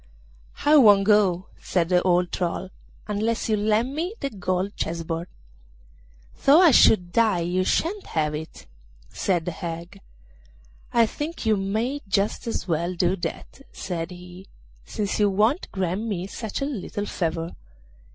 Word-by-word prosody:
'I 300 Hz, +1 st, +7 dB
won't 205 Hz, -7 st, +7 dB
go,' 195 Hz, -3 st, +3 dB, 0.2 s
said 175 Hz, -2 st, 0 dB
the 180 Hz, -1 st, +4 dB
old 180 Hz, -1 st, +2 dB
troll, 185 Hz, +1 st, -3 dB, 0.4 s
'unless 220 Hz, +2 st, -1 dB
you 215 Hz, -, +3 dB
lend 215 Hz, +5 st, +1 dB
me 345 Hz, +8 st, -3 dB
the 275 Hz, -, -3 dB
gold 185 Hz, 0 st, -2 dB
chess 165 Hz, 0 st, -3 dB
board.' 165 Hz, +1 st, -4 dB, 1.2 s
'Though 285 Hz, +4 st, +7 dB
I 355 Hz, -4 st, +7 dB
should 180 Hz, -7 st, +5 dB
die 220 Hz, -6 st, +3 dB
you 180 Hz, +2 st, 0 dB
shan't 375 Hz, -, -1 dB
have 150 Hz, -2 st, -1 dB
that,' 155 Hz, +2 st, -7 dB, 0.4 s
said 175 Hz, -4 st, -1 dB
the 180 Hz, -, -2 dB
hag. 170 Hz, +2 st, -7 dB, 0.9 s
'I 235 Hz, -1 st, +4 dB
think 295 Hz, +5 st, -5 dB
you 220 Hz, -1 st, +4 dB
may 220 Hz, +8 st, -2 dB
just 195 Hz, +4 st, 0 dB
as 225 Hz, -, -3 dB
well 170 Hz, +2 st, -1 dB
do 175 Hz, +1 st, +1 dB
that,' 185 Hz, -, -6 dB
said 170 Hz, -3 st, -4 dB
he, 180 Hz, +1 st, -12 dB, 0.4 s
'since 205 Hz, -, -3 dB
you 205 Hz, -1 st, +4 dB
won't 215 Hz, -, +1 dB
grant 185 Hz, 0 st, -2 dB
me 200 Hz, -6 st, -3 dB
such 215 Hz, +4 st, -5 dB
a -, -, 0 dB
little 215 Hz, -6 st, -4 dB
favour. 165 Hz, -3 st, -3 dB
195 Hz, 150 wpm, -24 LUFS, 175-220 Hz, 1.2 s, I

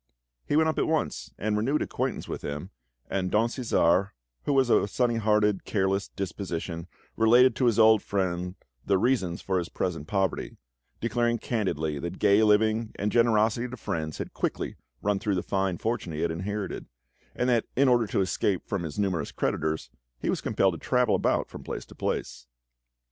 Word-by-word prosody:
He -, -, +1 dB
went 160 Hz, +1 st, +4 dB
up 160 Hz, -, 0 dB
at -, -, +1 dB
once 160 Hz, -1 st, -1 dB
and 105 Hz, +1 st, -1 dB
renewed 130 Hz, +8 st, +1 dB
acquaintance -, -, -3 dB
with -, -, -5 dB
him, 75 Hz, +6 st, -5 dB, 0.4 s
and 95 Hz, -2 st, -1 dB
Don 110 Hz, +4 st, +2 dB
Cæsar, 100 Hz, -7 st, +2 dB, 0.4 s
who 145 Hz, -, +1 dB
was 130 Hz, -3 st, +3 dB
of -, -, +6 dB
a -, -, -1 dB
sunny 120 Hz, +2 st, +1 dB
hearted, 105 Hz, -2 st, +2 dB
careless 95 Hz, -1 st, 0 dB
disposition, 85 Hz, -3 st, -5 dB, 0.3 s
related 120 Hz, +3 st, +5 dB
to 130 Hz, -, +2 dB
his 115 Hz, -3 st, +3 dB
old 110 Hz, -2 st, +6 dB
friend 90 Hz, -2 st, -2 dB, 0.3 s
the 100 Hz, -, +2 dB
reasons 95 Hz, -6 st, 0 dB
for 95 Hz, -1 st, 0 dB
his 85 Hz, -, -4 dB
present 80 Hz, -5 st, -3 dB
poverty, 95 Hz, -1 st, -1 dB, 0.4 s
declaring 120 Hz, +1 st, +1 dB
candidly 80 Hz, -, -2 dB
that 85 Hz, +4 st, -5 dB
gay 100 Hz, 0 st, +4 dB
living 110 Hz, +1 st, +3 dB
and 105 Hz, +1 st, -1 dB
generosity 115 Hz, 0 st, +3 dB
to 130 Hz, +1 st, -8 dB
friends 80 Hz, -7 st, -3 dB
had -, -, -6 dB
quickly -, -, -2 dB, 0.3 s
run 100 Hz, -1 st, +1 dB
through 105 Hz, -2 st, 0 dB
the 90 Hz, -, -1 dB
fine 95 Hz, -2 st, 0 dB
fortune 110 Hz, -6 st, -2 dB
he 75 Hz, -, -3 dB
had 85 Hz, -1 st, +1 dB
inherited, 100 Hz, +4 st, -4 dB, 0.5 s
and 125 Hz, -, 0 dB
that 120 Hz, -2 st, +2 dB
in 140 Hz, +2 st, +4 dB
order 120 Hz, -3 st, +4 dB
to 100 Hz, -, 0 dB
escape 95 Hz, 0 st, 0 dB
from 100 Hz, -3 st, -2 dB
his 80 Hz, -4 st, -6 dB
numerous 95 Hz, -7 st, -1 dB
creditors, 80 Hz, -6 st, -2 dB, 0.3 s
he -, -, 0 dB
was -, -, -2 dB
compelled 95 Hz, -2 st, +2 dB
to 80 Hz, -, -7 dB
travel 125 Hz, +1 st, +2 dB
about -, -, +1 dB
from -, -, -10 dB
place -, -, -5 dB
to -, -, -14 dB
place. 60 Hz, -, -3 dB
100 Hz, 185 wpm, -27 LUFS, 90-115 Hz, 0.5 s, of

